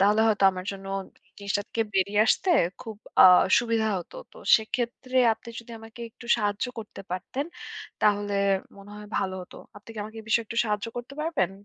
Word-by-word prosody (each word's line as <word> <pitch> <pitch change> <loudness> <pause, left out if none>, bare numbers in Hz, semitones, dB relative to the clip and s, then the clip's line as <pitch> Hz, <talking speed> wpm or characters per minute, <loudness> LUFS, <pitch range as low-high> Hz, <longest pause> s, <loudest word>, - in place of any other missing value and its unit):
তাহলে 205 +2 +4
হয়তো 205 -2 +2
আমার 185 0 -6
জন্য 195 0 -9 0.5
জিনিসটা 200 0 -1
থেকে 230 - 0
বেরিয়ে 200 +2 +2
আসতে 375 - +2 0.3
খুব 225 -4 -8 0.2
আ - - +10 0.3
সুবিধা 230 -2 0
হতো। 175 - -10 0.2
তো - - -17 0.2
সেক্ষেত্রে 240 +3 -4 0.2
আপনি 225 - -15
যদি 235 - -16
আমাকে 225 +1 -13
একটু 235 - -14
সাহায্য 205 0 -1
করতে 215 -2 -8
পারতেন, 200 +10 -3 0.5
তাহলে 205 -1 +2 0.4
মনে 200 +1 -13
হয় 210 0 -10
ভালো 190 -1 -2
হতো। 180 - -14 0.2
আপনি 205 - -15
কি - - -8
আমাকে 220 +1 -9
এ - - -20
বিষয়ে 230 +1 +2
একটু 230 - -4
সাহায্য 210 0 -1
করতে 245 +3 -7
পারবেন? 305 - 0
215 Hz, 180 wpm, -26 LUFS, 200-235 Hz, 0.5 s, আ